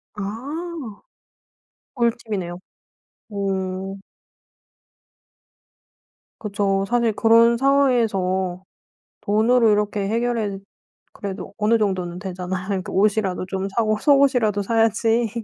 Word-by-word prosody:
아. 210 - -6 1.7
꿀팁이네요. 220 -8 -2 0.7
오. 195 -1 -3 2.4
그쵸. 195 -2 0
사실 235 -1 +1
그런 230 +2 +5
상황에서 210 -9 +1 0.6
돈으로 225 +2 +3
이렇게 205 -1 0
해결해 225 -3 -1 0.5
그래도 195 -2 -7
어느 225 +2 +3
정도는 185 -4 -1
되잖아요. 185 0 -5
그러니까 195 -3 -3
옷이라도 195 -2 +1
좀 190 +1 -3
사고 215 +1 0
속옷이라도 250 -7 +3
사야지 225 +2 +2
210 Hz, 220 characters per minute, -22 LUFS, 190-230 Hz, 2.4 s, 그런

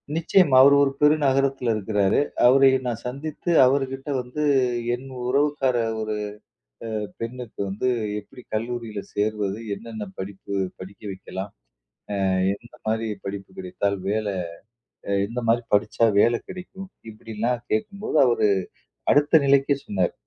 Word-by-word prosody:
நிச்சயமா. 165 -3 +4
அவர் 140 +1 +7
ஒரு 135 - +2
பெருநகரத்தில 135 -4 +3
இருக்கிறாரு. 105 -2 +1 0.3
அவரை 135 +1 +6 0.2
நான் 115 -2 -2
சந்தித்து 150 +6 -4
அவருகிட்ட 135 +1 0
வந்து 125 +5 -4 0.5
என் 130 +2 -11 0.2
உறவுக்கார 140 -1 +1 0.2
ஒரு 110 0 -2 0.7
அ 110 - -2 0.2
பெண்ணுக்கு 120 0 -7
வந்து, 105 +6 -2 0.3
"எப்படி 105 +4 -14
கல்லூரியில 115 -2 -3
சேர்வது? 105 -1 -1 0.2
என்னென்ன 110 -2 -7
படிப்பு 95 +1 -7 0.3
படிக்க 95 +3 -11
வைக்கலாம்? 95 +1 -7 0.8
அ - - +2 0.3
எந்த 120 +3 -19
மாதிரி 110 0 0 0.2
படிப்பு 100 0 -6
கிடைத்தால், 180 - -2
வேலை 105 -1 -1 0.8
அ - - 0 0.2
எந்த 115 +3 -4
மாதிரி 115 +1 +2
படிச்சா 110 +2 +2
வேலை 120 +2 +4
கிடைக்கும்?" 185 +1 -9 0.2
இப்படில்லாம் 115 +3 -3
கேட்கும்போது, 210 -5 -1
அவரு 120 -3 +3 0.6
அடுத்த 145 +2 +5
நிலைக்கே 140 0 +3
சொன்னார். 95 -4 0
120 Hz, 120 wpm, -24 LUFS, 105-140 Hz, 0.8 s, அவர்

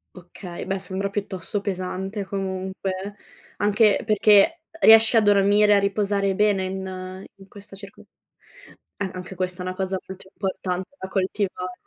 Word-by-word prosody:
Okay, 175 0 -9
beh 195 0 -1
sembra 195 +1 -3
piuttosto 200 0 -4
pesante 190 +1 -4
comunque, 190 0 -4 0.4
anche 210 +1 +3
perché 215 - +4 0.2
riesci 225 -2 +7
a 225 - +6
dormire, 205 +1 +4
a 200 - +5
riposare 200 -1 0
bene 205 -2 +2
in 185 0 -6
in 195 0 -16
questa 200 0 -13
circo 200 0 -13 1.0
eh, 200 -2 -2
anche 185 +1 -8
questa 180 0 -3
è - - -6
una 185 - -3
cosa 190 0 -2
molto 190 0 -11
importante 185 -1 -3
da 190 - -7
coltivare. 190 -1 -2
195 Hz, 140 wpm, -23 LUFS, 185-205 Hz, 1.0 s, riesci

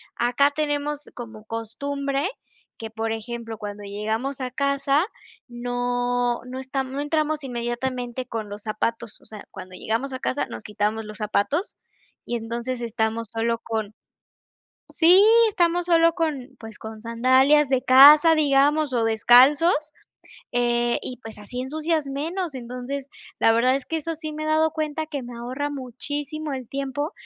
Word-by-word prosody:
acá 250 +4 +2
tenemos 295 -1 -2
como 220 -3 -9
costumbre, 275 - -3 0.5
que 225 -1 -7
por 225 0 -3
ejemplo, 230 0 -5
cuando 205 -1 -7
llegamos 220 +7 -3
a 255 -1 -3
casa 280 +3 +1 0.4
no 245 0 -1
no 255 +1 -6
estam 265 0 -3
No 285 - -2
entramos 305 0 -1
inmediatamente 245 0 -3
con 225 -3 -5
los 205 +1 -8
zapatos. 220 +1 -3
O - - -21
sea, 215 -2 -11
cuando 185 0 -10
llegamos 230 +8 -2
a 260 - -4
casa, 270 +1 -1
nos - - -8
quitamos 210 +1 -2
los 215 0 -9
zapatos, 220 - -1 0.5
y 240 - -2
entonces 235 +2 -4
estamos 225 -1 -2
solo 230 0 0
con 220 -2 -4 1.0
Sí, 350 +4 +6 0.3
estamos 350 -2 +1
sólo 335 -1 +4
con 305 -6 -3
pues 225 -1 -10
con 220 -1 -9
sandalias 260 +5 +4
de 260 -1 +1
casa, 295 +5 +8
digamos, 290 -1 +3
o 235 - +2
descalzos. 255 - +6 0.8
Eh, 240 0 +1
y 255 - -5
pues 220 -1 -9
así 210 +4 -7
ensucias 310 +3 -1
menos. 315 +4 -3
Entonces, 255 +3 -6 0.3
la - - +5
verdad 250 +3 +3
es 275 - -6
que 325 - -2
eso 330 +2 -4
sí 310 -1 -6
me 310 0 -5
he - - -3
dado 315 +1 +3
cuenta, 310 0 -3
que 290 -3 -5
me 240 0 -9
ahorra 260 +5 -4
muchísimo 290 +3 -5
el 255 -3 -7
tiempo. 275 +4 -3
255 Hz, 155 wpm, -24 LUFS, 230-290 Hz, 1.0 s, casa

